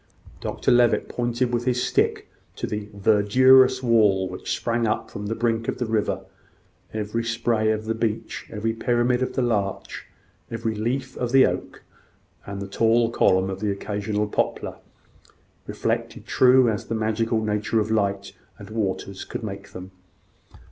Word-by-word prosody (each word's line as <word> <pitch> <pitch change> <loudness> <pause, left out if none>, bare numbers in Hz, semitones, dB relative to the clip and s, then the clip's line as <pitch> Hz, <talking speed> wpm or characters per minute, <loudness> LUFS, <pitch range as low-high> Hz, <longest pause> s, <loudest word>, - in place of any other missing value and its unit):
Dr - - -1
Levitt 120 -1 +4
pointed 120 0 -1
with 120 0 0
his 125 -1 +1
stick - - 0 0.3
to - - -3
the 105 -1 -5
"verdurous 130 +6 +5
wall" 105 -6 +3
which 90 0 -4
sprang 115 -1 0
up 105 - -2
from 100 0 -6
the 115 - -2
brink 115 0 0
of - - -2
the 125 - -2
river, 110 -2 -1 0.7
every 110 +2 -2
spray 115 -1 0
of 110 0 -1
the 115 - 0
beech, 110 -1 -3
every 110 +1 -2
pyramid 120 +2 +1
of 130 - -1
the 130 - 0
larch, 105 -5 -2 0.4
every 115 -1 -2
leaf 125 +5 -3
of 125 -1 -2
the 135 0 +7
oak, - - -4 0.6
and 100 0 -5
the - - -6
tall 115 +3 +2
column 95 -3 +2
of 95 - -5
the 105 0 -1
occasional 105 +1 -2
poplar, 105 - -2 0.9
reflected - - -3
true 130 0 +5
as 110 -3 -1
the 115 - -3
natural 110 +1 0
magic 105 0 -2
of 110 -1 +2
light 100 -2 0 0.2
and 100 +1 -11
waters 100 -3 -3
could - - -6
make 100 -2 -6
them. 95 +1 -9
110 Hz, 160 wpm, -24 LUFS, 105-120 Hz, 0.9 s, the